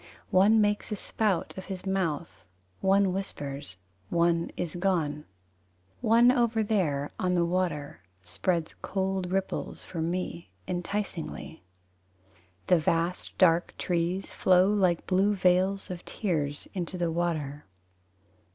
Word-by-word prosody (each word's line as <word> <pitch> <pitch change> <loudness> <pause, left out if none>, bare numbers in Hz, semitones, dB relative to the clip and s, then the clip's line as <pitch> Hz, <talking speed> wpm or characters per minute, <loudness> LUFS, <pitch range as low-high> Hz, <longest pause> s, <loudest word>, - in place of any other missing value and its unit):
One 205 +4 +5
makes 210 +1 +1
a - - 0
spout 205 -2 -1
of 190 - -9
his 190 -1 -6
mouth, 175 -5 -2 0.4
One 195 -1 +3
whispers 140 - -5 0.3
one 170 0 +2
is 170 -3 -2
gone. 165 -5 0 0.8
One 235 +2 +6
over 235 -3 +2
there 155 -10 0
on 180 0 +1
the 170 -1 +3
water 170 - -2 0.2
Spreads 160 - -1
cold 190 -2 -2
ripples 190 0 -2
For 165 - -5
me 170 0 -3 0.2
Enticingly. 180 -2 -4 1.0
The 180 - +4
vast 165 +3 -1
dark 170 -2 +3
trees 175 +2 -1
Flow 185 +2 +4
like 185 -5 +2
blue 195 +2 +2
veils 185 +1 +2
Of 175 -1 -6
tears 150 -8 -2
Into 180 -1 -4
the 170 -2 0
water. 155 - -2
180 Hz, 120 wpm, -28 LUFS, 165-195 Hz, 1.0 s, One